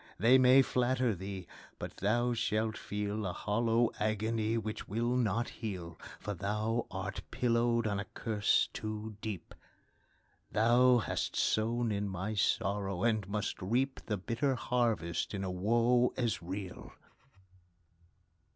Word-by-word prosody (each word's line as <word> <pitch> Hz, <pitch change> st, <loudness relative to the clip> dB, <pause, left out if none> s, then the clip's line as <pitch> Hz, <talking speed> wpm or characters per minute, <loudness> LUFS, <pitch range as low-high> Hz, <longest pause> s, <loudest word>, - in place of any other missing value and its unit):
they 120 Hz, +6 st, +6 dB
may 130 Hz, +1 st, +7 dB
flatter 125 Hz, -2 st, +1 dB
thee, 95 Hz, 0 st, -6 dB, 0.3 s
but -, -, -7 dB
thou 120 Hz, +5 st, +1 dB
shall 110 Hz, -1 st, 0 dB
feel 105 Hz, 0 st, -3 dB
A 90 Hz, -3 st, -2 dB
hollow 115 Hz, +4 st, +1 dB
agony 110 Hz, +1 st, 0 dB
which 110 Hz, -1 st, -4 dB
will 120 Hz, +4 st, 0 dB
not 120 Hz, -1 st, +1 dB
heal, 90 Hz, -7 st, -6 dB, 0.2 s
For 105 Hz, -, -4 dB
thou 105 Hz, +5 st, -1 dB
art -, -, -4 dB
pillowed 115 Hz, -1 st, +1 dB
on 100 Hz, -2 st, 0 dB
a 100 Hz, -, -3 dB
curse 105 Hz, -2 st, +1 dB
too 110 Hz, 0 st, -5 dB
deep; 105 Hz, -7 st, -5 dB, 1.0 s
Thou 120 Hz, +3 st, +5 dB
hast 115 Hz, -, -2 dB
sown 115 Hz, +1 st, +1 dB
in 100 Hz, 0 st, -1 dB
my 95 Hz, +3 st, -3 dB
sorrow, 100 Hz, -2 st, 0 dB
and 110 Hz, -4 st, +1 dB
must 105 Hz, 0 st, -2 dB
reap 125 Hz, +8 st, 0 dB
The 105 Hz, -, 0 dB
bitter 120 Hz, +8 st, 0 dB
harvest 110 Hz, -7 st, 0 dB
in 100 Hz, -, -3 dB
a 95 Hz, -, -2 dB
woe 120 Hz, +6 st, +3 dB
as 120 Hz, -7 st, 0 dB
real! 95 Hz, +2 st, -6 dB
110 Hz, 135 wpm, -32 LUFS, 100-120 Hz, 1.0 s, may